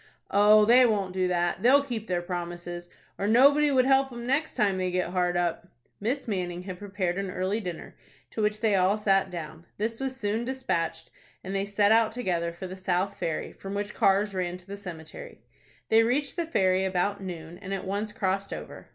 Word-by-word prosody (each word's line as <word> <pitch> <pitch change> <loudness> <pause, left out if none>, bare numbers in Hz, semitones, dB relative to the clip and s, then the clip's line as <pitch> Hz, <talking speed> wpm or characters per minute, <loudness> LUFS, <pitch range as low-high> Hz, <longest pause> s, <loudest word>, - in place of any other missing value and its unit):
"Oh, 210 +1 +6
they 245 +3 +7
won't 205 -6 +1
do 185 -1 +1
that. 175 -1 0
They'll 275 +4 +5
keep 230 -5 -5
their 175 -1 -1
promises, 175 0 -5 0.3
or 200 - 0
nobody 280 +6 +5
would 260 -2 +3
help 270 0 +3
'em 240 -1 -7
next 280 +5 0
time 195 -3 +1
they 185 0 0
get 180 -1 -1
hard 180 -1 +1
up." 175 0 -1 0.3
Miss 250 +7 -2
Manning 180 -4 -3
had 185 -1 -7
prepared 195 -3 -2
an 195 -1 -3
early 185 +4 -1
dinner, 180 -6 -7 0.4
to 220 - -3
which 210 0 0
they 220 -2 +2
all 190 +2 +3
sat 195 -2 +2
down. 165 -1 -8
This 225 +2 -2
was 265 -1 -3
soon 220 0 -1
despatched, 180 -11 -2 0.3
and 195 +1 -5
they 195 +1 -1
set 205 +1 +3
out 225 -1 +4
together 175 -8 -1
for 170 +3 -8
the 185 0 -6
South 185 +1 -1
Ferry, 160 -2 -3
from 195 +1 -7
which 205 +1 -3
cars 200 +1 +2
ran 180 -1 -2
to 180 - -17
the 200 +1 -7
cemetery. 170 -6 -10 0.5
They 225 +1 +6
reached 265 +5 0
the 340 -3 -2
ferry 190 - +2
about 190 +2 0
noon, 175 -2 -7
and 195 -2 -8
at 195 -1 -3
once 205 +3 -2
crossed 195 0 -2
over. - - -8
195 Hz, 205 wpm, -27 LUFS, 180-220 Hz, 0.5 s, they